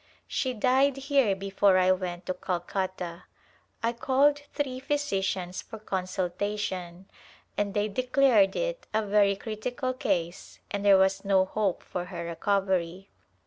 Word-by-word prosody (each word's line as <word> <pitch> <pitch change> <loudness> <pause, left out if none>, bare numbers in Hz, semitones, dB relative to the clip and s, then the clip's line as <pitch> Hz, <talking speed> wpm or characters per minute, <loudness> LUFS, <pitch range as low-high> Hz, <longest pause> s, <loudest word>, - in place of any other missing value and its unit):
She 255 -2 -2
died 265 +4 +3
here 275 -7 +2
before 195 0 +2
I 185 0 +4
went 180 -1 -2
to 185 - -1
Calcutta. 180 -1 -4 0.6
I 230 +1 +1
called 275 +4 +3
three 265 -3 -3
physicians 195 - -2
for 225 - -10
con 190 -3 -3
sultation 185 -1 -3 0.5
and 200 -1 -1
they 205 0 +1
declared 250 -2 +3
it - - -3
a 220 0 +1
very 200 -1 +3
critical 245 +5 -3
case 175 -8 -2
and 200 0 -2
there 200 -1 +7
was 190 0 +2
no 195 -1 +3
hope 200 -1 -1
for 180 -1 -4
her 175 -2 -6
recovery. 190 0 -1
200 Hz, 140 wpm, -28 LUFS, 185-250 Hz, 0.6 s, there